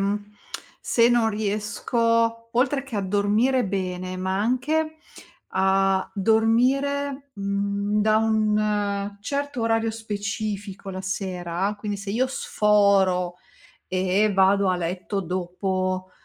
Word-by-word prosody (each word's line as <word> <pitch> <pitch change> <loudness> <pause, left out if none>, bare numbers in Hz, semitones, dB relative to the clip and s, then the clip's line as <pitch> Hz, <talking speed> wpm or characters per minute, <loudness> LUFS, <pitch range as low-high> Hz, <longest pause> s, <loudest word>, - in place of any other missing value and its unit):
mhmm, 205 +1 -2 0.5
se 235 0 +3
non 240 -2 +3
riesco, 230 +2 0
oltre 270 +3 +1
che 260 -6 -6
a - - +1
dormire 210 +6 +2
bene, 185 -1 -3
ma 190 +1 -1
anche 305 +8 0 0.6
a 190 0 +2
dormire, 265 +7 +1
mhmm, 200 +1 -1
da 215 +1 +3
un 210 -2 0
certo 280 +1 -3
orario 225 0 +1
specifico 205 -2 -4
la 185 - -5
sera, 190 0 -2
quindi 205 -1 -3
se 200 0 -6
io 250 +5 +1
sforo, 200 -7 +2 0.6
e 190 +3 +2
vado 195 0 +4
a 180 - +2
letto 180 +3 -3
dopo 185 +1 -2
205 Hz, 110 wpm, -24 LUFS, 190-230 Hz, 0.6 s, vado